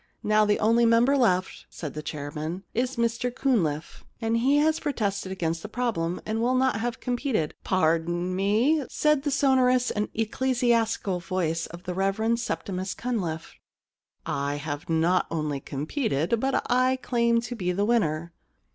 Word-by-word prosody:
* - - -45
Now 215 0 +5
the 210 0 +2
only 230 +2 +3
member 235 +4 +4
left,* 190 -8 +1
said 155 -4 -7
the 150 - -5
chairman, 150 +4 -5
* - - -45
is 255 +1 -4
Mr 235 +1 0
Cunliffe, 190 - -1 0.2
and 225 -1 0
as 290 +6 +3
he - - -9
pro 295 - -1
tested 200 -4 -2
against 165 -3 -2
the 215 - -7
problem, 215 -8 -1
and 220 +1 -1
will 250 +2 +2
not 255 -4 +2
have 240 +2 -3
competed 245 - -1
' - - -66
* - - -44
Pardon 175 +1 +1
me,' 225 +11 +2
said 300 -2 +2
the 290 - -1
sonorous 255 -2 +3
and 210 0 -2
ecclesi 245 +3 0
astical 220 -5 +1
voice 165 -3 -1
of 170 +1 -11
the 180 - -4
Rev. 210 +5 0
Septimus 190 -5 -3
Cunliffe. 180 -10 -3 0.5
* - - -50 0.2
I 145 - -2
have 145 +1 -5
not 165 +3 +2
only 150 -3 -2
competed, 160 - -1
but 270 +3 0
I 255 +1 +3
claim 235 -2 +1
to 245 +1 -5
be 180 -5 -1
the 200 +3 0
winner.' 170 -8 0
215 Hz, 175 wpm, -26 LUFS, 170-245 Hz, 0.5 s, Now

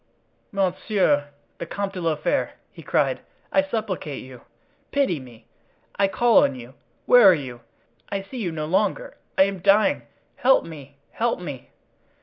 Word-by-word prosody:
"Monsieur 185 -6 +1 0.3
the 170 - -5
Comte 200 +2 -3
de 185 - -5
la 165 -2 +1
Fere," 150 - -1 0.2
he - - -13
cried, - - +1 0.3
"I 285 - +4
supplicate 215 - -4
you! 130 -2 -12 0.5
pity 270 - +1
me! 120 -3 -14 0.5
I 200 - +3
call 235 +4 +4
on - - +1
you—where 135 - +3
are 185 - +6
you? 130 -5 -7 0.5
I 195 -1 -3
see 255 +7 -10
you 185 -6 -2
no 155 -1 -4
longer—I 190 +2 0
am 195 -1 -2
dying—help 215 +5 +2
me! 140 -4 -11
help 235 -2 -1
me!" 145 -8 -8
185 Hz, 140 wpm, -24 LUFS, 145-210 Hz, 0.5 s, are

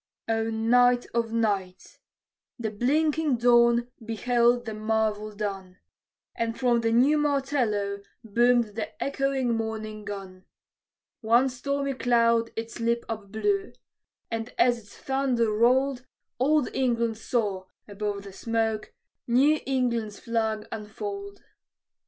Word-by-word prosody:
O 225 0 0
night 245 +2 +3
of 230 -1 0
nights! 200 -5 -2 0.6
The 225 -3 -3
blinking 295 +5 +1
dawn 235 0 +4
beheld 240 +2 +2
the 220 - -4
marvel 215 0 -1
done, 195 -3 -5 0.6
And 230 0 -3
from 240 -2 +2
the 225 0 +1
new 270 +6 +4
martello 255 -9 0 0.2
boomed 235 +1 +3
the 215 0 -6
echoing 275 -3 0
morning 220 -1 -4
gun. 195 -2 -8 0.7
One 235 +4 +3
stormy 275 +2 -2
cloud 235 -2 +2
its 230 +1 -5
lip 235 0 0
upblew; 225 - -2 0.6
and 225 +1 -3
as 240 -1 +3
its 205 -2 -17
thunder 260 -4 0
rolled, 255 +4 +2 0.3
Old 290 +1 +3
England 235 -3 0
saw, 205 -6 -1 0.2
above 205 -1 -4
the 200 -1 -10
smoke, 225 0 -2 0.3
New 275 +6 +4
England's 235 -5 -1
flag 220 -2 -2
unfold. 400 - -6
230 Hz, 115 wpm, -26 LUFS, 215-250 Hz, 0.7 s, dawn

